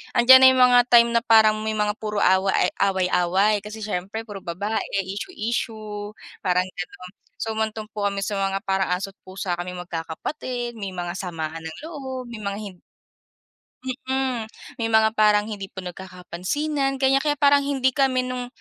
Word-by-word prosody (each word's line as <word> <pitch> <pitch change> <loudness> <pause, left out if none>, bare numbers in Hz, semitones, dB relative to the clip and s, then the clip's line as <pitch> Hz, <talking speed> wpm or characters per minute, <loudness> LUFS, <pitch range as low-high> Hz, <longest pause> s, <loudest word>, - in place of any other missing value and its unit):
andiyan 260 +2 +9
na 260 - +8
yung 255 - +6
mga 250 0 +7
time 235 -1 +6
na 235 - +3
parang 220 -2 +5
may 220 0 -2
mga 210 -1 +1
puro 210 -1 -1
awa 190 +1 +3
ay 180 - +2 0.2
away-away 190 +2 +2
kasi 215 +1 -8
siyempre 205 +2 -4
puro 205 -3 -8
babae, 195 +5 -3 0.2
issue-issue, 215 - -4 0.2
parang 180 -1 +1
gano'n. 180 0 -8 0.2
So, 225 - -4
humantong 220 0 -3
po 205 -1 -1
kami 200 0 -2
sa 200 0 -2
mga 195 0 -1
parang 190 0 0
aso't 195 +2 -5 0.2
pusa 185 -2 -4
kaming 180 +1 -5
magkakapatid, 240 - -5
may 195 -2 -5
mga 175 -1 -3
samaan 165 -3 -4
ng 160 - -9
loob, 265 -6 -7
may 230 - -7
mga 200 -1 -4
hin 200 -3 -8 1.1
Mm. 260 -3 -2 0.3
May 225 - 0
mga 220 -1 +4
parang 210 -1 +5
hindi 200 -2 -5
po 190 -1 -9
nagkakapansinan, 190 - -3
ganyan. 270 0 +3
Kaya 295 +1 0
parang 285 0 +5
hindi 265 -2 +1
kami 260 -1 +2
nung, 250 -1 -4
215 Hz, 170 wpm, -23 LUFS, 190-245 Hz, 1.1 s, andiyan